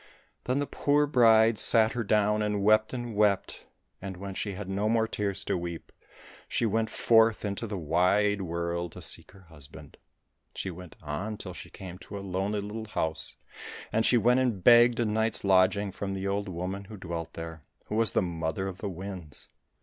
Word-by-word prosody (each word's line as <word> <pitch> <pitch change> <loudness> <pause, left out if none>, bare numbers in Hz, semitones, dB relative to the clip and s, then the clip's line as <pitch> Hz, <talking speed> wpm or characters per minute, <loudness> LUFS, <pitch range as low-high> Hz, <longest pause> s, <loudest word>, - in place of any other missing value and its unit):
Then 125 +2 0
the 145 - 0
poor 145 +1 +2
bride 115 -5 +5
sat 110 -1 +5
her 120 - -2
down 105 0 +2
and 105 -1 -1
wept 110 +1 +4
and 120 -3 -5
wept, 105 -2 +1 0.3
and 95 -1 -6
when 100 +1 -6
she 100 +1 -3
had 95 +1 -7
no 100 +3 -1
more 115 0 +2
tears 100 -2 -1
to - - -1
weep, 85 -2 -6 0.6
she - - 0
went 110 +1 0
forth 110 -1 +3
into 100 +3 -3
the 100 -2 -4
wide 90 +5 +2
world 85 -1 -3
to - - -10
seek - - -1
her 100 -1 -16
husband. 75 -4 -14 0.6
She 95 - -4
went 90 0 -11
on 95 +9 -4
till 90 -3 -7
she - - -10
came 90 -2 -9
to 100 - -8
a - - -6
lonely 100 +3 -1
little 110 +2 -6
house, 80 -6 -3 0.6
and 110 - +2
she 120 - +4
went 125 +3 +4
and 120 -8 0
begged 120 +1 +7
a 120 - +2
night's 110 +1 0
lodging 95 +1 +3
from 95 0 -4
the 95 0 -3
old 100 0 -2
woman 95 +3 -4
who 105 +1 -10
dwelt 85 -3 -6
there, 80 -1 -7 0.2
who - - -7
was 115 -2 +2
the - - +2
Mother 85 +2 -3
of 95 -1 -7
the 100 - -3
Winds. 90 -4 -6
100 Hz, 195 wpm, -28 LUFS, 90-110 Hz, 0.6 s, begged